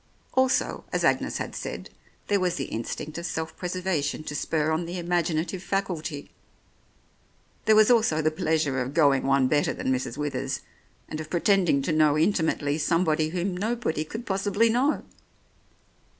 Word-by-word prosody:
Also, 260 0 +1
as - - 0
Agnes - - +1
had - - -5
said, - - -6 0.4
there 205 -1 +2
was 180 -2 0
the 135 - -2
instinct 145 +7 -5
of 170 - -6
self 160 0 -4
preservation 180 -5 -2
to 150 - -6
spur 155 +1 0
on 165 +2 -1
the 175 +2 -5
imaginative 175 0 -1
faculty. 175 -7 -3 1.3
There 220 - +5
was 215 +2 +6
also 220 -10 +3
the 155 0 +2
plea 160 +1 0
sure 140 -4 0
of 130 +4 -4
going 140 -5 +4
one 135 -1 +4
better 145 +1 +1
than 130 - 0
Mrs. 125 -2 -3
Withers 135 -2 -2 0.5
and 155 0 -5
of 155 - -9
pretending 175 -5 +2
to 165 - -1
know 155 -1 +4
intimately 160 -4 +1
somebody 160 -1 +2
whom 180 +2 -2
nobody 215 -5 -1
could 225 +9 -7
possibly 200 +3 +2
know. 265 +6 +1
160 Hz, 160 wpm, -26 LUFS, 150-190 Hz, 1.3 s, was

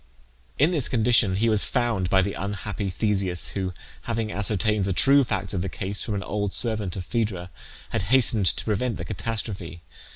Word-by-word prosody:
In 150 +6 +4
this 150 -8 0
condition 115 -5 +3
he 110 +4 +1
was 110 -2 +4
found 120 -8 0
by 95 0 +4
the 100 - -2
unhappy 100 0 -4
Theseus, 95 -2 0
who, 95 -2 -3 0.4
having 115 -2 -2
ascertained 105 0 +1
the 95 - 0
true 140 +1 +6
facts 95 -6 -3
of 90 - -1
the 95 - -2
case 100 +3 -3
from 110 - -2
an 100 - -3
old 100 -1 -3
servant 110 -6 0
of 90 -3 -5
Phaedra, 100 -7 -2 0.4
had - - -1
hastened 115 -6 +4
to - - 0
prevent 110 0 -1
the 85 - -6
catastrophe. 95 -5 -5
105 Hz, 185 wpm, -25 LUFS, 95-115 Hz, 0.4 s, true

